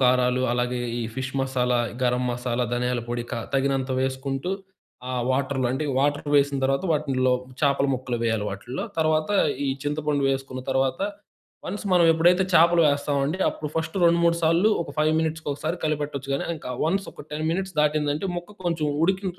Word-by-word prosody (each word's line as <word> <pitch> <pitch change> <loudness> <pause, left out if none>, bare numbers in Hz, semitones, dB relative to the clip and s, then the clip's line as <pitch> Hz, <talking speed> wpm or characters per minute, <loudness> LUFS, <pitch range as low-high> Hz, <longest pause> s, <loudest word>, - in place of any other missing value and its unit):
కారాలు 125 0 +3
అలాగే 125 0 -1 0.2
ఈ - - -1
ఫిష్ 130 0 -4
మసాలా, 125 -2 +1 0.2
గరం 125 0 +2
మసాలా, 120 0 -1
ధనియాల 125 0 0
పొడి 120 0 -2
క - - 0 0.2
తగినంత 135 -1 +1
వేసుకుంటూ 135 +4 -2 0.6
ఆ - - -3 0.2
వాటర్‌లో. 130 -1 0
అంటే 145 +4 -2
వాటర్ 145 +1 0
వేసిన 140 0 +3
తర్వాత 135 +6 +1
వాటిల్లో 130 -4 +1 0.3
చేపల 140 -1 +3
ముక్కలు 125 -1 -3
వేయాలి 110 -2 0
వాటిల్లో. 120 +7 -5
తర్వాత, 155 +2 +2 0.4
ఈ - - 0 0.2
చింతపండు 145 -1 0
వేసుకున్న 135 -1 -3
తర్వాత, 135 0 +1 0.7
వన్స్ 205 +3 -5
మనం 175 -2 +5
ఎప్పుడైతే 175 +3 +4
చేపలు 170 +1 +6
వేస్తామండి 145 +3 0
అప్పుడు 150 - -6
ఫస్ట్ 160 +2 -2
రెండు 170 0 +4
మూడు 170 0 +4
సార్లు 165 +6 +4
ఒక - - -9
ఫైవ్ 155 +1 +3
మినిట్స్‌కొసారి 160 0 -2
కలిపెట్టొచ్చు 145 -3 -2
గానీ - - -2
ఇంకా 125 - -7
వన్స్ 195 +4 0
ఒక - - -11
10 155 +1 -3
మినిట్స్ 190 +2 -2
దాటిందంటే 150 +3 +1
ముక్క 190 +4 -8
కొంచెం 165 -3 0 0.2
ఉడికి, 190 +2 +1
140 Hz, 160 wpm, -25 LUFS, 130-160 Hz, 0.7 s, చేపలు